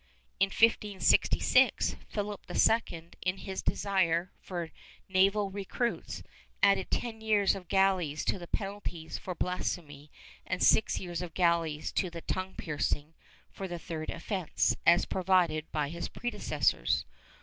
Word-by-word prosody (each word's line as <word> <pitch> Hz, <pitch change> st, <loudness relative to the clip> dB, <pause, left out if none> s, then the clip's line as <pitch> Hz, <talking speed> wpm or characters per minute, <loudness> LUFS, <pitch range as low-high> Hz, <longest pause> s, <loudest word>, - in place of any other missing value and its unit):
In 195 Hz, -, +5 dB
1566, 210 Hz, -1 st, +3 dB
Philip 205 Hz, -1 st, -3 dB
II 170 Hz, -7 st, +2 dB
in 180 Hz, +1 st, -1 dB
his 190 Hz, -1 st, -5 dB
desire 180 Hz, -3 st, +1 dB
for 170 Hz, -3 st, -5 dB, 0.4 s
naval 195 Hz, +1 st, +3 dB
recruits, 205 Hz, +5 st, -3 dB, 0.4 s
added 195 Hz, -1 st, +4 dB
ten 225 Hz, -2 st, -3 dB
years 210 Hz, -3 st, +3 dB
of 190 Hz, -3 st, -8 dB
galleys 185 Hz, -6 st, +2 dB
to -, -, 0 dB
the 175 Hz, -, -9 dB
penalties 195 Hz, -6 st, -4 dB
for 180 Hz, -, -5 dB
blasphemy 155 Hz, -5 st, -3 dB, 0.4 s
and 185 Hz, -, -1 dB
six 220 Hz, -, +4 dB
years 175 Hz, -2 st, -4 dB
of 175 Hz, -3 st, -7 dB
galleys 170 Hz, -4 st, +1 dB
to 185 Hz, -, 0 dB
the 170 Hz, -1 st, -8 dB
tongue 185 Hz, +2 st, -3 dB
piercing 150 Hz, 0 st, -2 dB, 0.4 s
for 195 Hz, -, -6 dB
the 175 Hz, -1 st, -5 dB
third 160 Hz, -2 st, -5 dB
offence, 185 Hz, 0 st, 0 dB
as 170 Hz, +1 st, +6 dB
provided 180 Hz, -4 st, +1 dB
by 150 Hz, -2 st, -1 dB
his 170 Hz, +2 st, -5 dB
predecessors. 155 Hz, -, 0 dB
185 Hz, 130 wpm, -30 LUFS, 165-195 Hz, 0.4 s, as